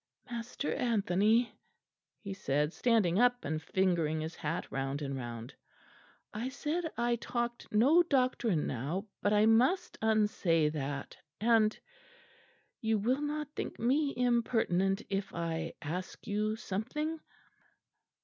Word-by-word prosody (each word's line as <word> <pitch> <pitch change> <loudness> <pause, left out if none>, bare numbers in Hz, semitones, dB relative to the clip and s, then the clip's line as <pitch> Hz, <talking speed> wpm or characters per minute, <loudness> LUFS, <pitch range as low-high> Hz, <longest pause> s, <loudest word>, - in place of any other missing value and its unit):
"Master 235 +4 -3
Anthony," 225 -1 +2 0.7
he 200 -2 -4
said, 150 -3 0
standing 215 -7 +2
up 245 0 +3
and 155 +1 -2
fingering 170 -2 +1
his 160 +1 -4
hat 160 +3 -3
round 135 +1 -2
and 140 -1 -3
round, 120 -2 -6 0.8
"I 230 +5 -3
said 315 +5 -2
I 240 0 +1
talked 240 +1 -3
no 270 +11 +6
doctrine 255 - +1
now; 150 - -3 0.2
but 205 - +2
I 210 0 +5
must 245 +11 +3
unsay 210 -8 +2
that; 145 -2 -4 0.2
and 220 -1 +3 1.0
you 220 -2 +2
will 250 +7 +1
not 300 0 -2
think - - -4
me 275 +5 +2
impertinent 225 -5 +2
if 195 0 -2
I 165 -1 -2
ask 180 +5 -5
you 215 +1 0
something?" 300 +11 -3
215 Hz, 120 wpm, -32 LUFS, 165-240 Hz, 1.0 s, no